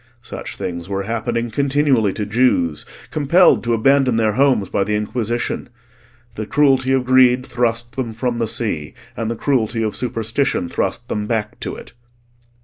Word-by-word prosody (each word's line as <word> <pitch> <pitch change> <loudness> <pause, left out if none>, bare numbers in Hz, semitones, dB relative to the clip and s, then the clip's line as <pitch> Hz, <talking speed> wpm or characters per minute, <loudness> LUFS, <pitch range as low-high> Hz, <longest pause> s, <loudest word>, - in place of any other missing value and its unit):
Such - - -7
things 85 0 -5
were 100 0 -2
happening 115 +2 -2
continually 135 -4 +2
to 105 - -3
Jews 105 -8 +1 0.2
compelled 155 +5 +4
to 115 0 +1
abandon 135 +1 +3
their 110 -1 +2
homes 130 -4 +2
by 100 - 0
the 105 +2 -1
Inquisition: 115 +3 -2 0.6
the 110 -1 -5
cruelty 135 -1 +3
of 130 -1 +2
greed 130 0 +4
thrust 120 -1 -1
them 125 -4 -3
from 120 0 -2
the 115 - 0
sea, 100 -10 -3 0.2
and 115 0 -3
the 115 - -2
cruelty 115 -3 0
of 110 -2 -2
superstition 115 -3 -1
thrust - - -2
them 105 0 -3
back 110 -2 -2
to - - -4
it. - - -12
115 Hz, 160 wpm, -19 LUFS, 110-130 Hz, 0.6 s, compelled